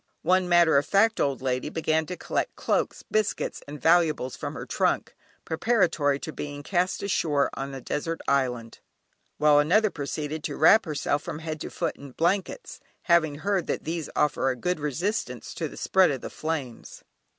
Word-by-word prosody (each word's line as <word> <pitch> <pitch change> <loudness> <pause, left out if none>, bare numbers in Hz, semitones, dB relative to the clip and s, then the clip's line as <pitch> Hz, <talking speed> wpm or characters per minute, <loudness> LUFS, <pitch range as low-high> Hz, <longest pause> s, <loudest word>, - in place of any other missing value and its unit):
One 185 +1 +2
matter 170 -4 +5
of 145 - -4
fact 220 +3 +3
old 140 -2 0
lady 130 +2 -1
began 160 0 0
to 180 - -5
collect - - -2
cloaks, - - -1
biscuits, 215 0 -1
and 145 +1 -8
valuables 160 -4 +2
from - - -6
her - - -6
trunk, - - 0 0.3
preparatory 165 -6 +1
to 155 - -6
being 145 0 -6
cast 180 +3 0
ashore 150 -7 +1
on 135 0 -5
a 135 - -7
desert 165 +6 -3
island, 125 -4 0 0.6
while 150 -1 +5
another 200 +8 +3
proceeded 150 0 -4
to 145 - -4
wrap 210 +8 +6
herself 145 -2 -1
from - - -6
head 155 -1 -5
to - - -5
foot - - -3
in 140 -2 -11
blankets, 190 - -1 0.2
having 165 -4 +3
heard 195 +3 -1
that - - -2
these 165 -1 -4
offer 135 -2 +2
a 130 - -1
good 180 +8 -2
resistance 165 - -3
to - - -3
the - - -12
spread 190 -2 +3
of 135 -3 -3
the - - -7
flames. 150 -7 -5
155 Hz, 175 wpm, -26 LUFS, 145-180 Hz, 0.6 s, wrap